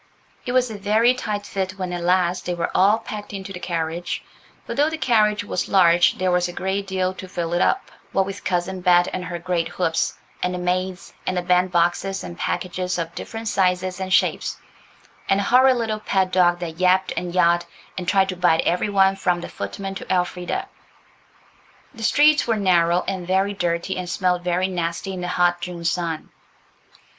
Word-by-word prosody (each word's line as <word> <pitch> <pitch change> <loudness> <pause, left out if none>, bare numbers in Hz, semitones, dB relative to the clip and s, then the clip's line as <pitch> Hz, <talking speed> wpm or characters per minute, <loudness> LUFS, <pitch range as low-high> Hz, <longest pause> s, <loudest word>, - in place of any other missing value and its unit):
It - - -1
was 250 -2 +2
a 210 - -7
very 220 +5 +3
tight 210 -5 -4
fit 190 -2 -3
when 185 -2 -4
at 175 - -3
last 180 0 +1
they 175 - -1
were 170 -1 -2
all 200 +4 +4
packed 210 -2 -8
into 195 0 -6
the 180 - -7
carriage, 170 0 -3 0.4
for - - -4
though 295 +2 +2
the 320 - -4
carriage 215 -7 +2
was 185 - -3
large 175 -3 +5
there 185 0 +1
was 180 0 +2
a 175 - -7
great 190 +2 -2
deal 185 -1 -1
to 190 0 -9
fill 170 -2 -3
it 175 - +1
up, 390 - +1 0.2
what 195 - +2
with 195 +1 -7
Cousin 185 +1 -1
Bet 175 -1 +4
and 185 - -3
her 175 0 -4
great 170 -1 -1
hoops, 170 -2 -1 0.3
and 180 0 -1
the - - -3
maids, 180 +1 -2
and 185 - 0
the 180 - 0
band 180 +1 +2
boxes 175 +3 +1
and 170 - -7
packages 180 +1 -2
of 170 -1 -4
different 225 0 -6
sizes 185 -2 0
and 190 0 -4
shapes, - - +1 0.7
and 195 - +3
the - - 0
horrid 255 +4 +5
little 220 -2 -2
pet 190 -3 0
dog 175 -1 +4
that 165 -1 -6
yapped 185 +1 +3
and 180 0 -4
yahed, 175 -1 +4 0.3
and 180 -1 -5
tried 190 0 +3
to 185 - -2
bite 175 -2 +3
every 180 +4 0
one, 195 -1 +4
from 180 -2 0
the - - -6
footmen 195 -1 -5
to 195 - -7
Elfrida. 180 -1 -1 1.3
The 230 - -11
streets 295 +6 +4
were 225 -2 +1
narrow 175 -3 +3
and 185 -2 -3
very 190 +2 +1
dirty, 175 0 -2
and 180 -1 -4
smelt 180 0 0
very 180 +1 0
nasty 175 +1 -3
in 185 - -5
the 180 - -3
hot 175 -1 +1
June 175 -1 -6
sun. 165 -2 -2
185 Hz, 200 wpm, -22 LUFS, 175-195 Hz, 1.3 s, large